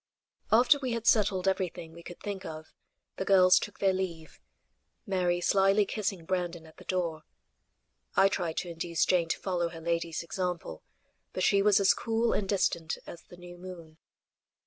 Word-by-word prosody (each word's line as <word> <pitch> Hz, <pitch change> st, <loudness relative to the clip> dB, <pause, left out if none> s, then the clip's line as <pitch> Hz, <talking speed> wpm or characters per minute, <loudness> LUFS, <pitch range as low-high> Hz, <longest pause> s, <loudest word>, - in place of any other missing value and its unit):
After 255 Hz, +6 st, +5 dB
we 255 Hz, -3 st, -2 dB
had 230 Hz, -1 st, -4 dB
settled 195 Hz, -5 st, +3 dB
everything 180 Hz, -3 st, -2 dB
we 170 Hz, -, -12 dB
could 175 Hz, +1 st, -11 dB
think 200 Hz, -2 st, -5 dB
of, 155 Hz, -2 st, -9 dB, 0.4 s
the -, -, -2 dB
girls 185 Hz, -2 st, +6 dB
took 205 Hz, -, -7 dB
their 195 Hz, -1 st, +2 dB
leave; 170 Hz, -4 st, -5 dB, 0.7 s
Mary 180 Hz, -3 st, 0 dB
slyly 195 Hz, +3 st, +3 dB
kissing 195 Hz, -4 st, -3 dB
Brandon 175 Hz, -2 st, -2 dB
at 160 Hz, -, -17 dB
the -, -, -13 dB
door. 170 Hz, -4 st, -2 dB, 0.9 s
I 195 Hz, -, +6 dB
tried 175 Hz, -4 st, -2 dB
to 180 Hz, -, -2 dB
induce 170 Hz, 0 st, -1 dB
Jane 170 Hz, -3 st, +2 dB
to -, -, 0 dB
follow 175 Hz, -3 st, -1 dB
her 165 Hz, -, -9 dB
lady's 170 Hz, 0 st, -2 dB
example, 175 Hz, -, -4 dB, 0.5 s
but 185 Hz, -, -2 dB
she 200 Hz, -1 st, +4 dB
was 205 Hz, 0 st, +4 dB
as 195 Hz, -, +5 dB
cool 230 Hz, 0 st, 0 dB
and 195 Hz, -2 st, -2 dB
distant 170 Hz, -5 st, 0 dB
as 170 Hz, -, -10 dB
the 175 Hz, -, -16 dB
new 175 Hz, 0 st, -12 dB
moon. 170 Hz, -3 st, -11 dB
180 Hz, 170 wpm, -29 LUFS, 170-195 Hz, 0.9 s, girls